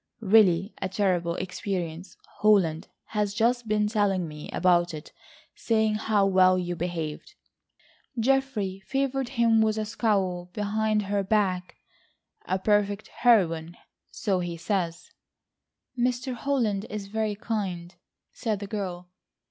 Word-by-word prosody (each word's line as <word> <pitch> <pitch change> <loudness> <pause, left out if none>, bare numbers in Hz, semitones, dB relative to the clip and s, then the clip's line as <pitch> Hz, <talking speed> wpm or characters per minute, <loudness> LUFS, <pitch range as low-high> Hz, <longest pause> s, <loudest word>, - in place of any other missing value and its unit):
Really 195 -2 +4
a 190 - -1
terrible 180 -4 0
experience. 180 -2 -4 0.2
Holland 190 -7 +3 0.2
has 210 -2 -1
just 235 +1 +1
been 210 0 +2
telling 200 -5 +1
me 150 -1 -9
about 175 -2 +2
it—saying 220 +7 -3
how 210 -1 +2
well 185 -1 +5
you 175 -1 -2
behaved," 170 - -4 0.8
(Geoffrey 230 -6 0
favoured 270 -1 -1
him 230 -1 +4
with 220 0 +2
a 215 - -1
scowl 190 -5 -1
behind 215 0 0
her 200 0 0
back), 190 -3 0 0.7
"a 185 - 0
perfect 205 +1 +1
heroine,—so 185 -1 0
he 175 -1 -4
says." 170 -2 -2 0.8
"Mr. 250 +1 -1
Holland 235 -6 -1
is 210 -2 -5
very 215 +1 -2
kind," 190 -5 -4 0.4
said 220 -4 -2
the 200 - -5
girl. 185 -4 -5
200 Hz, 115 wpm, -26 LUFS, 180-220 Hz, 0.8 s, well